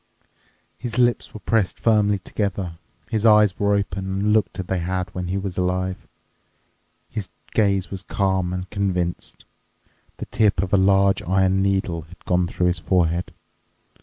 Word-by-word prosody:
His 120 -2 -5
lips 120 -1 +2
were 110 - -9
pressed 110 -5 0
firmly 105 -3 +3
together, 95 -3 -3 0.3
his 110 -1 0
eyes 105 -3 +5
were 100 0 +3
open 95 -1 -2
and 100 +2 0
looked 105 -2 +1
as 95 - -3
they 95 0 -1
had 90 +1 -3
when 90 -1 -4
he 95 +2 -1
was 95 -2 -3
alive, 90 0 -2 1.0
his 105 -4 -5 0.2
gaze 100 -3 +1
was 95 -2 -5
calm 95 -2 0
and 90 0 -4
convinced. 90 -4 -2 0.7
The - - -5
tip 105 -3 +2
of 95 - -4
a - - +7
large 95 0 +4
iron 95 +1 +2
needle 95 -4 0
had 85 +3 -17
gone 90 0 +2
through 90 - -1
his 90 -1 +1
forehead. 85 0 +1
95 Hz, 160 wpm, -22 LUFS, 90-100 Hz, 1.0 s, a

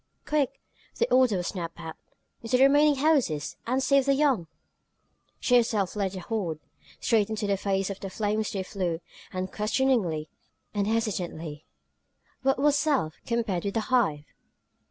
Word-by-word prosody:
"Quick!" 295 -3 0 0.4
the 470 - +2
order 255 -6 +5
was 175 - -3
snapped 170 -3 -5
out. 160 -1 -7 0.5
"Into 235 +2 +1
the 260 - +5
remaining 290 +2 +5
houses, 265 - +1
and 260 +2 +1
save 275 0 +3
the 275 - +4
young!" 270 - +2 0.9
She 245 - +4
herself 220 -5 +1
led 200 -2 -1
the 185 - -6
horde. 175 -6 -3 0.4
Straight 220 -2 +2
into 220 -1 -2
the 200 -1 +2
face 195 0 -1
of 195 - -7
the 195 - -5
flames 215 +2 -1
they 195 -2 -2
flew, 180 -4 -2 0.3
unquestioningly, 195 - 0 0.5
unhesitantly. 195 -8 -2 0.8
What 270 0 +2
was 290 +1 +3
self, 285 - 0
compared 230 -7 -1
with 200 - -2
the - - +3
Hive? 155 -12 +2
210 Hz, 150 wpm, -27 LUFS, 185-260 Hz, 0.9 s, order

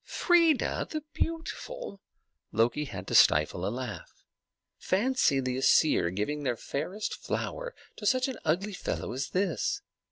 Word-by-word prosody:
"Freia 335 -5 +2
the 310 -1 -4
beautiful!" 330 - -4 0.5
Loki 120 +7 +1
had 95 -8 -7
to - - -5
stifle 75 +4 +4
a - - +1
laugh. 120 -1 -7 0.5
Fancy 200 - +2
the 130 -1 -1
Æsir 135 - +4
giving 145 +9 -2
their 125 -4 -1
fairest 180 - -3
flower - - -4 0.2
to 210 - -3
such 255 +3 +3
an 260 -3 -5
ugly 195 +6 0
fellow 180 - -3
as 130 +2 -3
this! 185 -3 -1
165 Hz, 135 wpm, -29 LUFS, -, 0.5 s, stifle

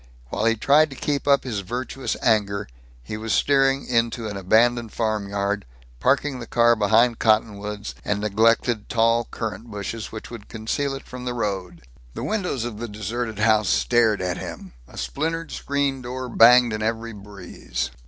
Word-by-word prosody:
While 110 - -2
he 115 0 +3
tried 150 +7 +4
to 135 - -9
keep 145 +1 -2
up 140 -1 +4
his 115 -6 -3
virtuous 125 +6 -4
anger, 100 -3 +1 0.4
he 105 - -6
was 110 0 -2
steering 135 -1 +3
into 115 -1 0
an 105 - -5
abandoned 115 +4 +2
farmyard, 100 -2 -1 0.4
parking 135 - +1
the 120 - -8
car 120 0 +4
behind 110 +3 +3
cottonwoods 105 -2 0
and 105 0 -1
neglected 110 +2 +2
tall 115 0 +2
currant 110 0 -5
bushes 105 +1 -5
which 110 +1 -8
would 115 -3 -10
conceal 135 +6 -2
it 135 - -9
from 125 0 -8
the 125 -1 -2
road. 95 - -3 0.3
The - - -5
windows 190 - -1
of 110 -3 -6
the 120 - -4
deserted 110 +2 -4
house 110 0 +3
stared 115 -5 +2
at 90 -1 -2
him; - - -8
a - - -14
splintered 160 - -3
screen 140 -1 -1
door 125 +1 -5
banged 120 0 +6
in 110 - -3
every 115 +1 -2
breeze. 100 - -6
115 Hz, 165 wpm, -23 LUFS, 105-125 Hz, 0.4 s, banged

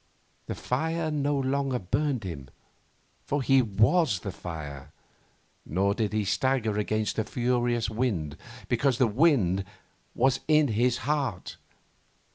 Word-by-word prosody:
The - - -3
fire 160 +5 -1
no 145 -1 0
longer 135 -1 0
burned 130 +5 -1
him, 75 -8 -7 0.7
for 145 -1 -1
he 135 0 +5
was 110 - +2
the 100 - -4
fire; 75 -6 -8 0.7
nor 95 +5 +1
did 110 -1 -1
he 105 -1 0
stagger 115 -1 +1
against 110 0 -1
the 110 - +1
furious 120 0 0
wind, 105 - -2 0.3
because 125 +1 +1
the 130 - +4
wind 110 - +3 0.5
was 130 +1 +2
in 155 -2 +4
his 120 +3 +2
heart. 140 -10 -2
120 Hz, 125 wpm, -27 LUFS, 100-135 Hz, 0.7 s, he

